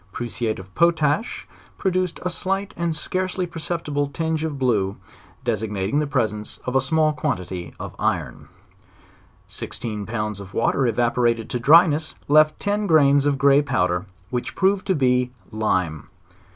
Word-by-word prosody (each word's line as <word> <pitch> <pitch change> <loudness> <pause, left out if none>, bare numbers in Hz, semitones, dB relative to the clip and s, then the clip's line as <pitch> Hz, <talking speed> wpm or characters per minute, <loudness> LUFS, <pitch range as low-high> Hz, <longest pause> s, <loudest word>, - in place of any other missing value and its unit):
Prusiate 120 -1 -3
of 95 0 -11
potash 165 +4 +1 0.3
pro 190 - 0
duced 185 -1 -1
a 180 - 0
slight 195 +3 -2
and 170 -2 -1
scarcely 185 +3 -2
perceptible 160 -3 -3
tinge 160 +2 -2
of 160 -2 -2
bjue, 110 -8 0 0.5
desig 110 -2 -1
nating 100 +6 -1
the 150 - 0
presence 110 -7 -2
of 125 - -3
a 135 - +5
small 155 +3 +2
quantity 90 - -4
of - - -7
iron. - - -2 1.0
Sixteen 105 -3 -5
pounds 105 -2 -3
of 100 0 -10
water 125 +3 +2
evaporated 120 0 +1
to 125 - 0
dry 160 +8 +7
ness, 155 -1 -2
left 155 +1 +4
ten 205 0 -1
grains 145 -4 +5
of 145 - +2
a - - -7
grey 140 +1 +5
powder, 90 -9 0 0.2
which 125 -1 -3
proved 190 0 +1
to 190 - +2
be 125 -3 +2 0.2
lime. 90 -8 -1
140 Hz, 155 wpm, -23 LUFS, 110-160 Hz, 1.0 s, dry